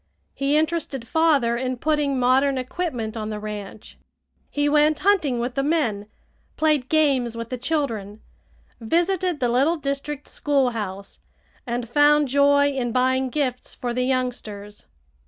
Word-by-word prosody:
He 280 +2 +1
interested 310 -6 -1
father 290 -7 +2
in 255 +1 -2
putting 295 -1 0
modern 265 +2 +3
equipment 255 -4 -3
on 215 -1 -4
the 210 -1 -4
ranch. 210 -1 -8 0.5
He 290 0 0
went 300 +1 +3
hunting 355 -11 +2
with 240 +1 -2
the 275 - 0
men, 255 -9 0 0.5
played 305 -5 +1
games 270 -7 +2
with 230 0 -5
the 255 - -3
children, 230 -8 -2 0.6
visited 345 - 0
the 245 - +1
little 270 +8 +2
district 280 0 -4
schoolhouse, 230 -9 -2 0.5
and 240 0 -3
found 290 +3 +4
joy 285 +1 +4
in 250 -3 -2
buying 260 +1 +1
gifts 255 -3 -3
for 245 -1 -3
the 250 - -1
youngsters. 240 -5 -3
260 Hz, 135 wpm, -23 LUFS, 235-295 Hz, 0.6 s, found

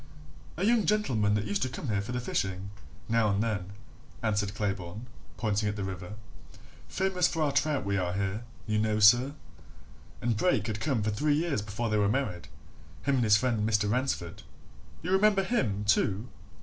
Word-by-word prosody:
"A 185 - 0
young 225 -5 +3
gentleman 115 - +2
that 105 0 -1
used 100 -1 -1
to 130 - 0
come 125 +1 -5
here 100 -1 +1
for 100 - -6
the 125 - -1
fishing, 95 -4 -2 0.4
now 115 -1 +2
and 100 +2 +1
then," 100 -5 -2 0.5
answered 105 -2 0
Claybourne, 100 +1 -3 0.3
pointing 105 -2 0
at 105 - -3
the 100 - -3
river. 95 0 -6 0.7
"Famous 190 -2 +1
for 165 -2 -1
our 145 - +1
trout 140 -3 +1
we 100 0 0
are 90 -1 -1
here, 100 +3 -2 0.2
you 110 0 0
know, 110 0 +1
sir. 120 +6 +6 0.9
And 120 -1 0
Brake 110 - +2
had 105 -2 -3
come 125 -4 0
here 110 - 0
for - - -4
three 145 +5 +2
years 155 -7 0
before 105 +3 -3
they 105 - +2
were 100 -1 +3
married 110 -8 -2 0.6
him 140 - +1
and 125 - +2
his 105 -2 +6
friend 115 -3 0
Mr. 105 -1 +2
Ransford." 125 -9 -2 0.6
"You 180 - -2
remember 195 0 +4
him, 115 - 0
too?" 105 +1 +1
110 Hz, 190 wpm, -29 LUFS, 100-135 Hz, 0.9 s, sir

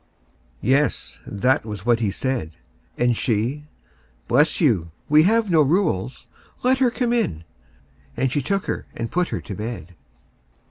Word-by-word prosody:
Yes! 135 +1 +1
that 125 +6 +1
was 105 -2 -7
what 120 -1 +3
he 110 -3 0
said. 100 -6 -2 0.4
And 120 -1 +2
she: 120 +7 -1 0.6
"Bless 150 +5 +3
you; 105 - +2 0.2
we 150 +1 +6
have 225 -3 +2
no 160 -2 +5
rules. 140 - 0 0.4
Let 260 +1 +3
her 260 -2 +4
come 240 0 -1
in." 85 - -1 0.7
And 130 +1 +1
she 145 - 0
took 195 +8 -1
her - - -4
and 115 - -4
put 180 0 +1
her - - -4
to 105 - -7
bed. 105 -4 -6
130 Hz, 150 wpm, -22 LUFS, 110-165 Hz, 0.7 s, we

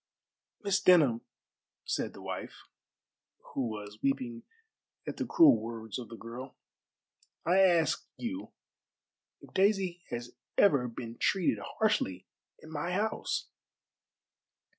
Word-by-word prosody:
"Miss 200 -1 +2
Denham," 145 -11 +6 0.6
said - - -1
the - - -11
wife, - - -6 0.9
who 130 -3 0
was 105 -1 -7
weeping 125 -4 -1 0.6
at - - -5
the - - -2
cruel 320 -4 +7
words 115 0 -5
of 120 - -8
the 115 - -8
girl, 120 +4 -8 0.9
"I 180 +3 +4
ask 170 -6 +4
you 280 +4 -5 0.9
if - - -15
Daisy 190 -3 +2
has 120 0 -5 0.2
ever 140 -11 +5
been 115 0 -7
treated 190 -3 +2 0.2
harshly 215 - +1 0.3
in 160 - -13
my 160 +3 -2
house?" 215 +3 -1
140 Hz, 115 wpm, -31 LUFS, 115-190 Hz, 0.9 s, cruel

